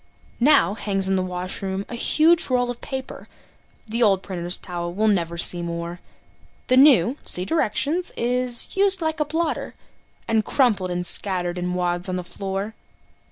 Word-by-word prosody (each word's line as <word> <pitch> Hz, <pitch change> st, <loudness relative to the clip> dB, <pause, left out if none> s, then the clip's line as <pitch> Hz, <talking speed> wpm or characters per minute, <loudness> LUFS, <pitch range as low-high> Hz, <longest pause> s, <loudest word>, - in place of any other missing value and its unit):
Now 270 Hz, -5 st, +4 dB
hangs 195 Hz, -3 st, 0 dB
in 190 Hz, -, +1 dB
the 185 Hz, -, +1 dB
washroom 185 Hz, +2 st, -4 dB
a -, -, -9 dB
huge 315 Hz, +8 st, +3 dB
roll 245 Hz, -1 st, +1 dB
of 240 Hz, -, -10 dB
paper 265 Hz, -1 st, -7 dB, 0.6 s
The 230 Hz, +2 st, -3 dB
old 195 Hz, -4 st, +3 dB
printer's 175 Hz, -2 st, -3 dB
towel 175 Hz, -1 st, -5 dB
we'll 215 Hz, +4 st, 0 dB
never 170 Hz, -5 st, 0 dB
see 175 Hz, +1 st, +2 dB
more. 170 Hz, 0 st, -5 dB, 0.7 s
The 255 Hz, -, +4 dB
new 260 Hz, -, +5 dB
(see 180 Hz, -, -1 dB
directions) 320 Hz, -, 0 dB
is 245 Hz, 0 st, -1 dB
"used 385 Hz, -2 st, +3 dB
like 315 Hz, 0 st, -2 dB
a 300 Hz, -, +1 dB
blotter," 320 Hz, +1 st, -3 dB, 0.5 s
And 220 Hz, -1 st, +1 dB
crumpled 210 Hz, -8 st, +1 dB
and 180 Hz, 0 st, -2 dB
scattered 180 Hz, -2 st, +2 dB
in 180 Hz, 0 st, -3 dB
wads 175 Hz, 0 st, -1 dB
on 185 Hz, -, -2 dB
the 180 Hz, -, -4 dB
floor. 195 Hz, +4 st, -5 dB
200 Hz, 160 wpm, -22 LUFS, 180-255 Hz, 0.7 s, new